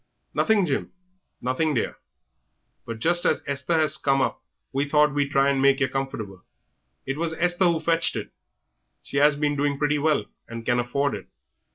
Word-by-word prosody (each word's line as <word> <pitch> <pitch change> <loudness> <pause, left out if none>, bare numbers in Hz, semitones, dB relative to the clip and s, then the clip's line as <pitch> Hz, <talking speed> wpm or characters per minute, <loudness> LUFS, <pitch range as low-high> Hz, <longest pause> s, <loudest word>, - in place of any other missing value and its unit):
"Nothing, 215 -4 +3
Jim; 140 -5 -2 0.5
nothing, 140 +5 0
dear, 115 - -2 0.9
but 115 -1 -5
just 175 +8 +2
as - - +1
Esther 140 +3 0
has 155 -1 +3
come 135 -1 +2
up - - -1 0.3
we 140 +2 -1
thought 150 -1 +4
we'd 145 -1 0
try 140 0 +3
to 135 - -1
make 135 0 +4
yer 135 - +2
comfortable. 110 -9 -5 0.6
It 135 +3 -3
was 165 -1 -1
Esther 175 +2 +2
who 170 -2 +2
fetched 165 +1 +1
it; - - -5 0.7
she 140 - -2
'as 150 0 +5
been 145 0 0
doing 145 0 0
pretty 145 0 +1
well, 145 -7 +1 0.2
and 115 0 -8
can 120 0 +2
afford 140 +4 0
it." - - -7
145 Hz, 180 wpm, -24 LUFS, 135-155 Hz, 0.9 s, as